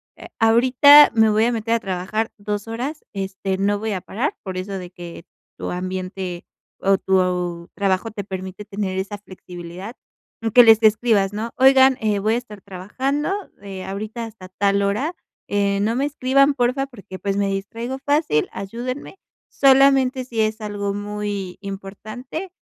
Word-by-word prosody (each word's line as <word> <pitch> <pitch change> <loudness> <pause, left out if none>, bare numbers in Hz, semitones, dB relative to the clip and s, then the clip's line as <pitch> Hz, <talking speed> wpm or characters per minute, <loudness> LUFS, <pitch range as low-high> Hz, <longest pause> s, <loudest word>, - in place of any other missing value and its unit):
eh, - - -11
ahorita 255 +6 +7
me 220 -1 +5
voy 215 +1 +3
a 240 - +2
meter 230 -1 -1
a 230 - +2
trabajar 195 +4 -2
2 205 0 -4
horas, 265 +7 -4
este, 195 -1 -3
no 200 +1 +1
voy 220 +1 -3
a 195 - -2
parar", 235 - -3
por 190 -2 -5
eso 195 +1 -4
de 180 -1 -7
que 175 -1 -10 0.3
tu - - -5
ambiente 185 0 -5 0.3
o 195 0 +3
tu 180 -2 0
trabajo 195 +2 0
te 205 -1 -5
permite 190 0 -7
tener 200 -2 -4
esa 200 +2 -4
flexibilidad, 185 +2 -10 0.6
que 245 - +9
les 225 -1 +7
escribas, 215 -2 +3
¿no? 220 +3 -4
Oigan, 265 0 +6
eh, 210 -2 0
voy 215 +3 +1
a - - +1
estar 215 -5 -9
trabajando, 260 - -3 0.3
eh, 195 -2 -7
ahorita 215 +5 -5
hasta 220 -4 -11
tal 200 +2 +1
hora, 215 - 0 0.3
eh, 200 -1 +1
no 220 +3 +1
me 275 - +1
escriban, 275 0 +3
porfa, 260 +1 0
porque, 200 -7 -11
pues, 200 -1 -2
me 200 0 +1
distraigo 230 +7 -4
fácil. 285 - +2
Ayúdenme, 250 - -6 0.3
solamente 270 -1 +4
si 240 -3 -6
es 220 0 0
algo 205 -1 -3
muy 205 -2 -4
importante, 215 - -7
210 Hz, 160 wpm, -21 LUFS, 195-245 Hz, 0.6 s, que